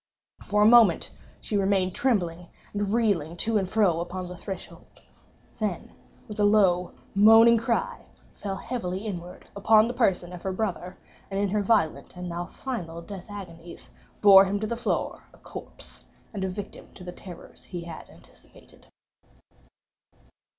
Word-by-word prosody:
For 210 0 +1
a - - +5
moment 225 -6 +5 0.3
she 215 - -4
remained 190 -2 +1
trembling 180 -9 -1 0.3
and 205 -1 -2
reeling 200 -9 +1
to 215 +4 0
and 190 -2 -3
fro 190 -6 +2
upon 180 +1 -5
the 180 - -8
threshold—then, 190 +1 -8 0.4
with 210 -1 -8
a - - +3
low 190 -4 +3 0.2
moaning 225 +3 +7
cry, 230 +1 -2 0.3
fell 195 -2 -5
heavily 195 -2 -4
inward 180 -4 -7
upon 215 +2 +5
the 245 - -3
person 185 -7 0
of 175 - -8
her 190 - -3
brother, 185 -2 -3 0.3
and 195 0 -2
in 200 -1 +1
her 210 +2 0
violent 200 -7 0
and 180 0 -6
now 175 0 -4
final 175 -11 -6
death 195 +1 -9
agonies, 175 -4 -10 0.3
bore 195 -1 +9
him 200 +1 -1
to - - -1
the 235 - -2
floor 240 - -2
a - - -21
corpse, - - -11 0.3
and 200 -2 -4
a 190 - -1
victim 200 +2 -8
to 180 - -11
the 180 - -7
terrors 180 -1 -12
he 175 - -6
had 170 -1 -9
anticipated. - - -20
195 Hz, 155 wpm, -26 LUFS, 180-215 Hz, 0.4 s, bore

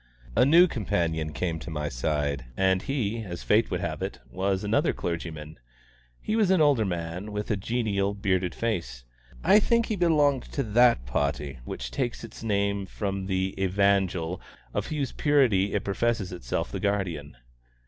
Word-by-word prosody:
A 120 +4 +5
new 170 +6 +7
companion 85 - -1
came 80 +3 -2
to 80 - -8
my 75 -2 -3
side, 70 +1 -1
and 95 -1 +3
he, 115 -4 -2
as 85 -4 -7
fate 110 +2 +3
would - - -2
have - - -3
it, - - -3
was 95 +1 -1
another 105 +2 +2
clergyman. 80 -2 -5 0.6
He 215 - -2
was 215 -4 +3
an 190 -2 +4
older 145 -8 +4
man, 90 +3 -4
with 105 +2 -3
a - - +3
genial, 100 -1 -1
bearded 95 -3 0
face. 85 - -3 0.4
I 210 - +7
think 235 +2 +2
he 220 - -2
belonged 150 -7 +3
to 140 - 0
that 120 - +4
party 70 +1 -2
which - - -5
takes 120 - -2
its 115 - -10
name 100 -2 0
from 100 -1 -3
the 95 0 0
Evangel 95 -3 +1 0.3
of - - -2
whose 145 -4 -2
purity 120 -10 +2
it 100 - 0
professes 100 -1 0
itself 65 -10 -3
the - - -3
guardian. 90 -10 -2
100 Hz, 165 wpm, -27 LUFS, 85-115 Hz, 0.6 s, new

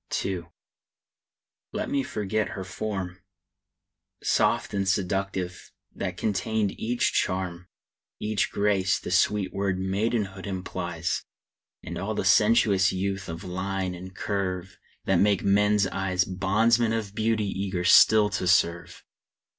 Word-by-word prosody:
II. 95 -3 -3 1.3
Let - - -2
me 140 - +2
forget 110 -3 -2
her 95 - -4
form! 95 -1 -5 1.0
Soft - - +1
and 100 -1 0
seductive, 95 -2 -2 0.2
that 90 -2 -4
contained 105 +2 0
each 120 +2 0
charm, 90 -1 -1 0.5
Each 105 -1 -1
grace 100 -2 +2
the - - -7
sweet 95 +1 +2
word 100 -1 -1
maidenhood 100 0 -1
implies; 90 -3 -3 0.6
And - - -6
all - - -3
the - - -2
sensuous 105 -3 +4
youth 95 0 -3
of 80 +4 -6
line 95 0 -3
and 90 +1 -9
curve, 95 -2 -3 0.3
That 95 - +3
makes 100 0 +3
men's 105 +1 +3
eyes 95 -1 0
Bondsmen 110 +5 +2
of 110 -3 -3
beauty 110 -1 0
eager 95 -2 -2
still 105 +4 +6
to 95 -2 -2
serve. 85 -1 +1
95 Hz, 125 wpm, -26 LUFS, 95-105 Hz, 1.3 s, still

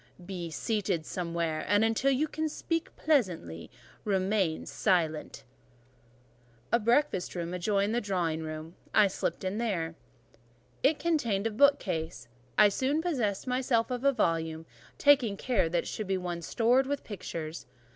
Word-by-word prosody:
Be 175 -3 -5
seated 190 -1 -1
somewhere; 170 -3 -2
and 205 +4 +4
until 225 +4 +2
you 275 +3 +2
can 315 +1 -2
speak 330 +2 -3
pleasantly, 180 - 0 0.3
remain 190 -4 0
silent." 160 -5 0 1.3
A 235 - +4
breakfast 235 -5 +1
room 170 0 -3
adjoined 200 +3 +1
the 240 - +1
drawing 175 -6 -1
room, 155 +1 -6 0.2
I 215 - +7
slipped 195 - -2
in 190 +3 -2
there. 175 -9 -1 0.9
It 290 +3 +3
contained 235 -12 0
a 225 - +1
bookcase: 185 - +1 0.3
I 210 - +8
soon 265 +9 0
possessed 240 - -1
myself 250 -2 +1
of 250 0 -3
a 275 - +5
volume, 165 -8 -1 0.3
taking 265 -8 +4
care 220 -9 +1
that 170 0 0
it - - -9
should 215 - -4
be 190 0 +1
one 175 -2 -4
stored 245 +9 +2
with 285 0 -2
pictures. 165 - -6
200 Hz, 145 wpm, -29 LUFS, 170-250 Hz, 1.3 s, I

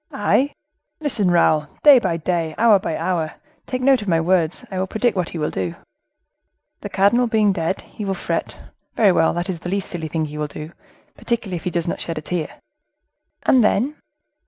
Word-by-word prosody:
"I! 280 +2 +1 0.5
Listen, 240 - 0
Raoul. 155 -3 +3 0.2
Day 285 -4 +9
by 180 -7 -1
day, 165 -1 -2
hour 220 -3 +5
by 165 -4 -3
hour,—take 180 +8 -4
note 265 -3 +4
of 205 - -7
my 165 -3 +3
words,—I 180 +2 0
will 190 - -1
predict 220 +3 0
what 180 -3 -1
he - - -6
will 150 -1 -1
do. 90 -3 -3 1.0
The - - -7
cardinal 235 +6 +3
being 215 -2 +3
dead, 165 +2 -2
he 215 - -9
will 195 -1 -1
fret; - - -3 0.4
very 210 -4 +5
well, 165 -2 +3
that 175 +1 -2
is 180 -4 -4
the 175 - -6
least 195 0 -2
silly 165 -3 -4
thing 160 0 -2
he 150 0 -7
will 150 - -1
do, 150 +2 -8 0.4
particularly 225 -7 -3
if - - -11
he - - +1
does 170 -1 -2
not - - -3
shed 165 - -4
a - - -3
tear." 160 0 -3 0.9
"And 255 -3 +4
then?" 245 +8 +1
185 Hz, 195 wpm, -21 LUFS, 165-215 Hz, 1.0 s, Day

